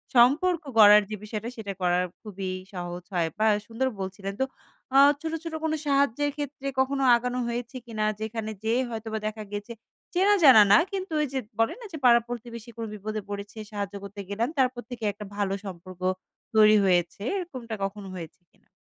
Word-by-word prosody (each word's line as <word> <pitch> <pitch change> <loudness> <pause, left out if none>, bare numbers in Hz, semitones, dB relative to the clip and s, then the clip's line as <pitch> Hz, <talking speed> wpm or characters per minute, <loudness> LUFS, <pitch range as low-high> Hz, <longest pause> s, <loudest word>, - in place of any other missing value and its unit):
সম্পর্ক 300 +9 +5 0.2
গড়ার 210 -1 +9
যে 215 - -3
বিষয়টা 215 +2 -4
সেটা 205 -3 -5
করার 180 0 +2 0.2
খুবই 195 -3 -5 0.2
সহজ 175 -1 -5
হয়। 170 -2 +1
বাহ! 220 0 +4
এ - - -4
সুন্দর 245 +3 -1
বলছিলেন। 195 +1 -5
তো - - +4 0.5
আ - - +7 0.2
ছোট, 325 0 -3
ছোট, 330 -1 -6
কোন 320 -1 0
সাহায্যের 280 0 +2
ক্ষেত্রে 285 -1 -5
কখনো 270 +1 +1
আগানো 250 +1 -2
হয়েছে 240 +1 -4
কিনা? 220 -3 -2 0.2
যেখানে 220 0 -3
যেয়ে 230 +3 +2
হয়তোবা 220 -1 -4
দেখা 215 0 -5
গেছে 205 +3 -5 0.4
চেনা 390 +3 +4
জানা 260 -7 +10
না। - - +9
কিন্তু 385 -2 -4
ওইযে 275 -3 -1 0.2
বলেন 225 - +2
না - - -8
যে, - - -4
পাড়া-প্রতিবেশী 235 -1 +1
কোন 230 - -3
বিপদে 215 +1 -4
পড়েছে, 205 +2 -6
সাহায্য 205 -1 -4
করতে 200 +1 -9
গেলাম। 225 +5 -1
তারপর 255 -2 +2
থেকে 240 -2 -7
একটা 210 +1 -9
ভালো 200 -1 0
সম্পর্ক 185 0 -9 0.5
তৈরি 215 0 +7
হয়েছে। 175 0 +1 0.2
এরকমটা 255 -11 -5
কখনো 195 0 -4
হয়েছে 165 -1 -8
কিনা? - - -33
220 Hz, 175 wpm, -27 LUFS, 205-255 Hz, 0.5 s, জানা